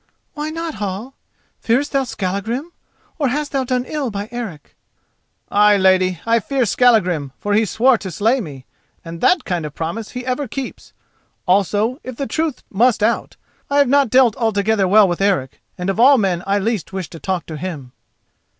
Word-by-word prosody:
"Why 300 +1 -4
not, 330 0 -4
Hall? 205 +6 -4 0.5
Fearest 260 +6 0
thou 275 -1 +1
Skallagrim? 225 - -3 0.5
or 285 - +2
hast 290 +3 -2
thou 270 -1 0
done 250 -1 -1
ill 285 -2 -3
by 205 0 -5
Eric?" 220 -11 -7 0.8
"Ay, 210 0 +5
lady, 185 -2 +3
I 230 0 +3
fear 260 +3 0
Skallagrim, 185 - +2
for 205 - -2
he 220 +2 +3
swore 240 +4 +3
to 190 - -6
slay 225 +9 +1
me, 140 - -9 0.4
and 165 0 -8
that 360 -3 +3
kind 175 -3 -2
of 150 -1 -7
promise 170 +7 -4
he 250 0 -7
ever 255 +2 -2
keeps. 265 +3 -7 0.5
Also, 205 - +1
if 255 -1 -7
the 275 - -3
truth 315 -1 -2
must 220 +1 +2
out, 230 +2 0 0.3
I 280 - +1
have 285 -3 +4
not 280 -2 +3
dealt 250 -2 +4
altogether 220 -3 +1
well 205 +2 +6
with 175 +1 -2
Eric, 185 -10 0 0.2
and 180 - -4
of 195 +2 -1
all 270 +3 +7
men 190 -6 0
I 200 +1 +2
least 215 -1 -2
wish 190 -3 -4
to 165 - -9
talk 185 -1 -2
with 155 -2 -7
him." 150 -8 -6
215 Hz, 185 wpm, -19 LUFS, 185-255 Hz, 0.8 s, all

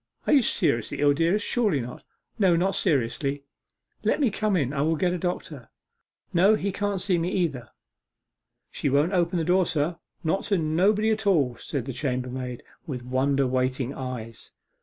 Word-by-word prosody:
'Are - - +3
you 280 - +6
seriously 115 - 0
ill, 145 0 +4
dearest? 170 +7 +1
Surely 210 - +1
not.' 125 0 -7 0.4
'No, 185 -4 +4
not 190 +3 +1
seriously.' 140 - 0 0.6
'Let - - +1
me 265 -7 +2
come 215 0 0
in; 140 -4 -1
I 140 - -1
will 160 +2 +2
get 175 +3 +1
a 180 - -3
doctor.' 155 -7 -4 0.6
'No, 195 +5 +5
he 200 -1 -2
can't 200 0 -2
see 180 -2 +1
me 170 +2 -1
either.' 145 -11 -1 1.0
'She - - -1
won't 145 +7 +2
open 175 0 +1
the 165 - 0
door, 180 0 +3
sir, 165 +1 -1 0.2
not 175 +4 +1
to 200 - +1
nobody 190 +7 +2
at 220 -1 -1
all!' 140 -11 +3
said 135 -1 -4
the 135 - -5
chambermaid, 125 -2 -3 0.2
with 125 -5 -5
wonder 135 +2 +1
waiting 130 +1 -1
eyes. 120 -4 -7
155 Hz, 175 wpm, -26 LUFS, 130-190 Hz, 1.0 s, you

